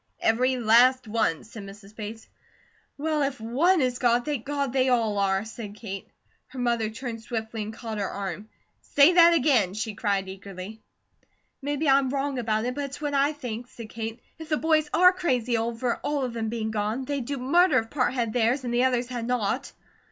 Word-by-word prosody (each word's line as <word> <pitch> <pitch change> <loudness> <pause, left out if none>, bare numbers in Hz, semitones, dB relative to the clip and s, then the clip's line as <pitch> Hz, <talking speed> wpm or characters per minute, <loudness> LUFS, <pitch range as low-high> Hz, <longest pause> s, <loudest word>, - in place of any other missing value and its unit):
"Every 255 +3 +2
last 245 +2 +4
one," 215 -7 0
said 220 0 -10
Mrs. 200 +1 -12
Bates. 220 +1 -7 0.7
"Well, 305 +1 0
if 275 -2 -1
ONE 290 +11 +2
is 250 -1 0
gone, 240 0 +3
thank 285 -5 -3
God 280 -3 -1
they 260 -1 +2
all 225 -5 +1
are," 195 +1 +1
said 220 -2 -8
Kate. 195 -3 -7 0.4
Her 260 - -13
mother 235 -3 0
turned 230 0 -6
swiftly 225 -1 -4
and 210 +1 -4
caught 220 -1 -6
her 200 - -1
arm. 200 +2 -5 0.3
"Say 290 +5 +5
that 340 -1 +7
again!" 240 - +2
she 215 0 -3
cried 200 -2 -1
eagerly. 195 +2 -9 0.8
"Maybe 290 +2 -1
I'm 270 -1 +4
WRONG 275 0 -1
about 220 -1 0
it, 250 - -1
but 285 +1 -3
it's 275 0 -8
what 295 -1 -3
I 280 +1 +3
think," 245 -5 -6
said 230 -2 -10
Kate. 225 +1 -5 0.2
"If 320 0 -9
the 305 - +2
boys 310 -1 +2
are 365 +3 +6
crazy 250 -10 0
over 235 +2 -1
all 290 -2 -2
of 250 -2 -3
them 225 -1 -2
being 220 -1 -3
gone, 215 +4 -2
they'd 280 -2 -3
do 280 +2 -3
murder 340 +9 +4
if 225 0 -1
part 260 -4 +1
had 230 -3 -1
theirs, 245 +3 +1
and 240 -1 -3
the 245 +2 +3
others 245 -1 +1
had 240 -2 -4
not." 245 +2 -1
240 Hz, 200 wpm, -26 LUFS, 220-275 Hz, 0.8 s, that